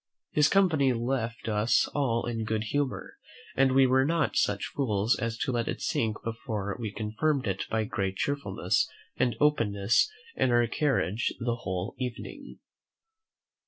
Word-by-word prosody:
His 150 -1 +4
company 160 -9 +3
left 115 -1 -2
us 105 +1 +2
all 125 -5 0
in 115 -2 -2
good 110 -1 -1
humour, 140 +4 -2 0.4
and 135 0 +4
we 135 0 +6
were 130 +1 +4
not 160 0 +1
such 100 -1 +1
fools 110 -5 +1
as 115 0 -2
to 130 - -1
let 120 -2 -1
it - - -3
sink 110 -1 -1
before 110 -3 -3
we 110 -3 -3
confirmed 110 +7 -1
it 95 -2 -2
by 110 0 0
great 100 -2 -2
cheerfulness 120 -4 0 0.3
and 120 -3 +1
openness 115 - +2 0.2
in - - +2
our 120 0 +4
carriage 115 -6 0
the 120 -1 -1
whole 95 -1 -4
evening. 125 -2 -6
115 Hz, 150 wpm, -28 LUFS, 105-135 Hz, 0.4 s, we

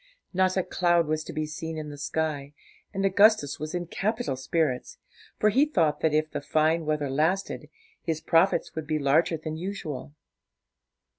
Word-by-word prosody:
Not 185 +1 +2
a 185 - +2
cloud 175 -2 +2
was 155 +1 -1
to - - -6
be 155 0 -2
seen 160 +1 -5
in 150 -1 -5
the - - -8
sky, 145 -2 -2 0.4
and 195 -1 -1
Augustus 195 -6 +4
was 155 +3 -4
in 175 0 -2
capital 215 - -2
spirits, 130 0 -1 0.4
for 215 - +4
he 265 +7 +4
thought 160 - +1
that 160 - +2
if 155 +1 +1
the - - -3
fine 155 +2 +1
weather 150 -2 0
lasted, 155 +2 -1 0.3
his 160 -2 -2
profits 165 +2 +2
would 160 -2 -5
be 155 - 0
larger 155 +4 +2
than 155 0 -5
usual. 160 -6 -5
160 Hz, 170 wpm, -27 LUFS, 150-180 Hz, 0.4 s, Augustus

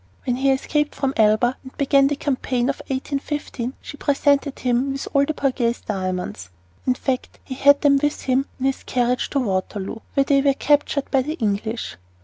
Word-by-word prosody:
When 245 -1 0
he 275 +1 +2
escaped 295 +2 0
from 270 -1 -1
Elba 220 +3 +3
and 260 - -13
began 275 -1 +4
the 290 - 0
campaign 255 -3 -1
of - - -9
1815 275 -2 -3
she 290 - -9
presented 285 0 +1
him 250 +2 0
with 275 - -5
all 280 0 +4
the 310 - -3
Borghese 255 -4 0
diamonds. 185 - -4 0.4
In 255 - +3
fact, 255 0 -3
he - - -6
had 285 +2 +5
them 280 -1 +5
with 295 0 -1
him 265 +1 +1
in 260 - -2
his 270 0 0
carriage 250 0 0
at 280 - +1
Waterloo, 195 -2 -2 0.2
where 275 - +4
they 275 0 +3
were 275 -1 +3
captured 290 -1 +1
by 270 - +4
the 300 +4 -3
English. 220 - -2
265 Hz, 185 wpm, -22 LUFS, 240-280 Hz, 0.4 s, had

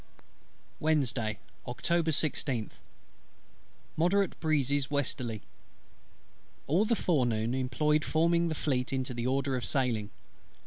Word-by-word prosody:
Wednesday, 130 -9 0 0.3
Oct. 125 -1 -7
16th. 155 -8 +1 1.2
Moderate 180 +4 +1
breezes 145 -3 +1
westerly. 125 -6 -1 1.2
All 175 +9 +2
the 235 - +2
forenoon 120 - +1
employed 145 +4 +1
forming 170 +1 +2
the 160 - -2
Fleet 130 -4 -1
into 130 -1 -2
the 120 +1 -2
order 135 0 0
of 125 - -3
sailing. 115 -4 0
140 Hz, 100 wpm, -30 LUFS, 125-160 Hz, 1.2 s, All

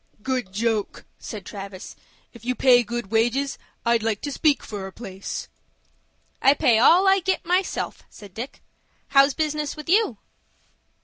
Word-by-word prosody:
"Good 255 -6 -2
joke!" 220 +1 -2
said 205 -4 -8
Travis. 195 -2 -8 0.4
"If 235 -2 -14
you 250 +1 -1
pay 245 -2 +5
good 240 -3 -5
wages, 240 +5 +1 0.3
I'd 235 -1 +3
like 220 -2 -1
to 290 - -4
speak 295 +1 +2
for 200 -3 -6
a - - -9
place." 195 -3 -7 0.9
"I 275 +2 +5
pay 245 -7 +3
all 350 +10 +6
I 385 0 +5
get 380 +1 -1
myself," 365 +3 -1
said 205 -3 -14
Dick. 240 +7 -7 0.5
"How's 275 0 +5
business 305 -2 -2
with 305 -1 -9
you?" 380 - +3
245 Hz, 150 wpm, -24 LUFS, 215-290 Hz, 0.9 s, all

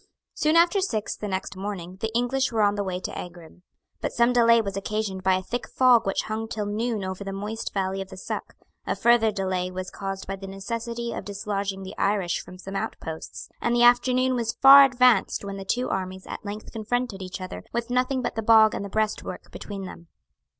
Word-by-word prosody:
Soon 310 +1 +1
after 345 +4 +5
six, 220 - -2
the 210 - -5
next 190 0 -3
morning, 185 -2 -6
the 220 +3 -3
English 255 +2 +1
were 220 -2 +2
on 205 0 +4
the 205 0 -2
way 185 -2 -3
to - - -5
Aghrim. 175 -1 -9 0.4
But - - -2
some 235 +1 +3
delay 230 -1 +6
was 200 -3 -3
occasioned 200 -1 -3
by 190 0 +3
a 185 - -2
thick 245 +5 -4
fog 250 -5 +4
which 195 - 0
hung 220 +1 -4
till 215 -2 -3
noon 215 +1 -2
over 190 +1 -4
the 195 - -5
moist 210 +3 -4
valley 195 0 -1
of 190 - -7
the 190 - -10
Suck; - - -5 0.3
a - - 0
further 235 -2 +4
delay 185 -2 -2
was 185 0 -6
caused 195 -1 -5
by 195 - -4
the 195 0 -8
necessity 230 +4 -4
of - - -5
dislodging 200 -1 -3
the 190 +2 -8
Irish 195 -4 +1
from 180 - -12
some 195 +2 -8
outposts; 160 -4 -5
and 235 0 +1
the 240 - +4
afternoon 250 +1 +4
was 235 -2 -1
far 275 +1 +10
advanced 250 -6 +3
when 200 0 -5
the 195 - -6
two 245 +6 0
armies 190 0 -4
at - - -7
length 210 +1 -7
confronted 225 -2 -2
each 185 0 -6
other 185 - -7
with 235 0 -3
nothing 255 +1 +1
but - - -2
the 225 - -2
bog 220 0 +6
and - - -3
the 200 - -6
breastwork 215 +1 -3
between 200 -2 -7
them. 170 -2 -10
210 Hz, 215 wpm, -25 LUFS, 190-235 Hz, 0.4 s, far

